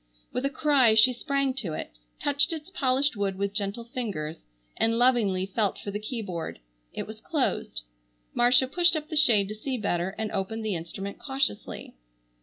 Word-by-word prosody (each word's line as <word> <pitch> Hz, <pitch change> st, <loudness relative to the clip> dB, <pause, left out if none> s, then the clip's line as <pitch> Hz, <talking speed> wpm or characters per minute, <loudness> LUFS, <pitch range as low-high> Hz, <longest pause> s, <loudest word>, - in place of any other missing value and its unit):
With 250 Hz, +2 st, -1 dB
a -, -, +2 dB
cry 280 Hz, -6 st, +4 dB
she 225 Hz, +4 st, +7 dB
sprang 275 Hz, +1 st, 0 dB
to 190 Hz, -11 st, -3 dB
it, -, -, -5 dB, 0.3 s
touched 285 Hz, +2 st, +3 dB
its 320 Hz, +2 st, -6 dB
polished 275 Hz, -3 st, +1 dB
wood 200 Hz, -2 st, -1 dB
with 200 Hz, 0 st, -1 dB
gentle 205 Hz, +2 st, -2 dB
fingers, 205 Hz, -11 st, -4 dB, 0.3 s
and 230 Hz, 0 st, +2 dB
lovingly 230 Hz, -7 st, +3 dB
felt 200 Hz, +1 st, 0 dB
for 200 Hz, -, -6 dB
the 205 Hz, -, -3 dB
keyboard. 210 Hz, -7 st, -4 dB, 0.3 s
It -, -, -4 dB
was -, -, -10 dB
closed. -, -, -1 dB, 0.5 s
Marcia 245 Hz, +2 st, +5 dB
pushed 345 Hz, +4 st, +3 dB
up 305 Hz, 0 st, -4 dB
the 315 Hz, -, -4 dB
shade 230 Hz, -10 st, +5 dB
to -, -, -3 dB
see 255 Hz, +5 st, -3 dB
better, 190 Hz, -3 st, -1 dB
and 220 Hz, -1 st, -2 dB
opened 220 Hz, +3 st, -3 dB
the 215 Hz, -, 0 dB
instrument 185 Hz, +4 st, -5 dB
cautiously. 270 Hz, -6 st, -2 dB
225 Hz, 175 wpm, -27 LUFS, 200-270 Hz, 0.5 s, she